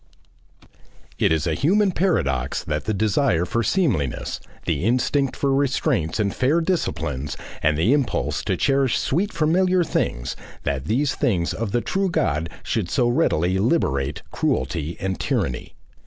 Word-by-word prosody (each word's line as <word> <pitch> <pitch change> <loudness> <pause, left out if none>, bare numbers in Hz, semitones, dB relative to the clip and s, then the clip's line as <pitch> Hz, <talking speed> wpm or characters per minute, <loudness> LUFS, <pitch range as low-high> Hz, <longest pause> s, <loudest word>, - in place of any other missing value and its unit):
It - - +3
is 80 -1 +1
a 80 - +1
human 195 - +2
paradox 70 - 0
that 75 0 -3
the 110 - 0
desire 105 - +2
for 115 - 0
seemliness, 110 - 0 0.3
the 70 - -1
instinct 130 +4 +1
for 140 -1 +1
restraints 135 - 0
and 100 -2 +1
fair 140 +6 +2
disciplines, 80 - -2 0.2
and 75 0 +2
the 95 - +3
impulse 140 -3 0
to - - 0
cherish 135 -2 +2
sweet 185 +9 0
familiar 180 +3 +2
things, 65 - -2 0.3
that 70 -2 -2
these 130 - +1
things 95 - 0
of 115 -3 -3
the 120 - +1
True 190 - 0
God 80 - 0
should 105 -6 -1
so 120 +3 +2
readily 95 -6 +2
liberate 70 - 0
cruelty 75 +5 -1
and 95 0 -2
tyranny. 60 - -2
110 Hz, 145 wpm, -23 LUFS, -, 0.3 s, It